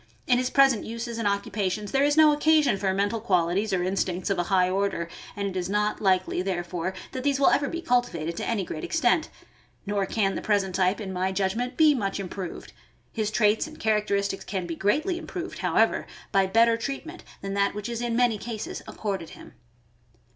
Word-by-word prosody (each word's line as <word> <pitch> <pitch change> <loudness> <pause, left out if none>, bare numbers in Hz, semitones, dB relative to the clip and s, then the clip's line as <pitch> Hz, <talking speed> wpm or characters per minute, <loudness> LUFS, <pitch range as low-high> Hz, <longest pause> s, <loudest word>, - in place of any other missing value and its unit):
In 245 -1 +3
his 255 0 0
present 270 -5 +4
uses 230 +1 -5
and 220 - 0
occupations 200 0 -2
there 270 - +2
is 290 +1 +2
no 310 -1 +7
occasion 300 -5 +3
for 195 -1 0
mental 205 +3 0
qualities 190 0 +1
or 185 -2 +1
instincts 185 0 -1
of 190 - 0
a 175 - 0
high 185 -2 +4
order, 190 -2 -1 0.3
and 200 0 -2
it 190 - -5
is 185 0 -2
not 210 +1 0
likely, 185 -2 +2
therefore, 180 -1 -3 0.2
that 260 - -4
these 280 -1 +1
will 280 - +5
ever 285 -1 +2
be 335 +1 -5
cultivated 245 - 0
to - - -3
any 215 -4 0
great 155 -3 -6
extent; 325 - +1 0.6
nor 200 -1 -1
can 195 -2 +1
the - - -4
present 200 -3 +1
type, 185 +2 +1
in 195 -3 -5
my 185 +1 0
judgment, 200 +6 -1
be 310 -2 +6
much 200 -7 -2
improved. 185 -2 -6 0.4
His 215 -2 -1
traits 215 +3 +2
and 310 0 -12
characteristics 200 -2 0
can 190 -3 -3
be 170 -1 -4
greatly 310 - 0
improved, 360 +1 -6
however, - - +2 0.2
by 195 -1 +3
better 230 +3 +4
treatment 280 +8 -6 0.2
than 195 0 -3
that 200 0 +1
which 210 +1 -4
is 235 -1 -4
in 240 -1 -1
many 240 -3 +2
cases 225 -1 -5
accorded 195 -6 -4
him. - - -13
205 Hz, 195 wpm, -26 LUFS, 190-240 Hz, 0.6 s, no